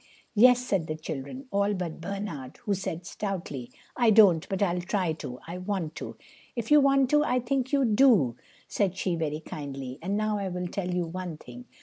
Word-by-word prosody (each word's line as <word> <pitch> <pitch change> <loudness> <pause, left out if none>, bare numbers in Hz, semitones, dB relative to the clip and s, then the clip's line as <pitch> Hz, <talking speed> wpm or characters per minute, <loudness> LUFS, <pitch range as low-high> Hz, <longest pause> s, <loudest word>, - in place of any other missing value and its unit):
"Yes," 250 +3 +7
said 190 -8 0
the 155 - -2
children, 155 - -6
all 200 +1 +1
but 170 -3 -5
Bernard, 170 -8 -5
who 205 - +1
said 180 -3 -4
stoutly: 175 - -4 0.3
"I 240 -3 +4
don't; 200 -7 +6
but 195 +1 0
I'll 180 -2 0
try 180 -2 0
to. 125 -5 -7
I 175 +2 -6
want 180 -4 -3
to." - - -7 0.4
"If 235 +2 -4
you 300 -1 +8
want 275 -1 +3
to, 300 0 +5
I 250 -3 +1
think 260 +1 -1
you 280 -2 +3
do," 210 - +4 0.3
said 190 -3 0
she 185 -2 0
very 155 -1 -2
kindly. 135 -3 -7
"And 195 +4 -1
now 215 -1 0
I 195 -1 -2
will 180 0 -3
tell 180 0 -3
you 180 -1 0
one 175 -1 -5
thing. 245 +9 -11
190 Hz, 200 wpm, -28 LUFS, 160-215 Hz, 0.4 s, you